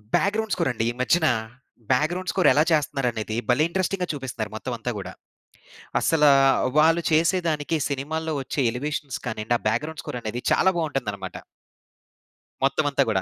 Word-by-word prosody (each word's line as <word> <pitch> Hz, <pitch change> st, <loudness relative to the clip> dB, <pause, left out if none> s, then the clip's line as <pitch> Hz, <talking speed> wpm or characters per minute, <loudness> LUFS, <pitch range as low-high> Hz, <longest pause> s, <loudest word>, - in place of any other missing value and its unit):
Background 215 Hz, +1 st, +1 dB
score 170 Hz, -5 st, 0 dB
అండి 115 Hz, -, -2 dB
ఈ -, -, 0 dB
మధ్యన. 160 Hz, +6 st, +2 dB, 0.7 s
బ్యాక్‌గ్రౌండ్ 170 Hz, +8 st, +1 dB
స్కోర్ 185 Hz, -, +2 dB
ఎలా 150 Hz, -, +4 dB
చేస్తన్నారనేది 125 Hz, -7 st, 0 dB
భలే 125 Hz, +5 st, +4 dB
ఇంట్రెస్టింగ్‌గా 185 Hz, 0 st, -1 dB
చూపిస్తున్నారు! 125 Hz, -7 st, -5 dB
మొత్తం 125 Hz, +3 st, -4 dB
అంతా 120 Hz, +2 st, -3 dB
గూడా. 95 Hz, -2 st, -7 dB, 0.9 s
అసలా 150 Hz, -3 st, +4 dB, 0.5 s
వాళ్ళు 165 Hz, +2 st, +4 dB
చేసేదానికి 165 Hz, -1 st, +1 dB
సినిమాల్లో 155 Hz, +3 st, -3 dB
ఒచ్చే 135 Hz, +2 st, -2 dB
ఎలివేషన్స్ 145 Hz, +2 st, -4 dB
కానియండి, 110 Hz, 0 st, -1 dB
ఆ -, -, -25 dB
బ్యాక్‌గ్రౌండ్ 155 Hz, +7 st, -3 dB
స్కోర్ 125 Hz, -, -5 dB
అనేది 115 Hz, +2 st, -4 dB
చాలా 190 Hz, -, +4 dB
బావుంటుందనమాట. 135 Hz, -, -3 dB, 1.3 s
మొత్తమంతా 140 Hz, 0 st, +2 dB
గూడా. 95 Hz, -4 st, +1 dB
145 Hz, 135 wpm, -24 LUFS, 125-165 Hz, 1.3 s, ఎలా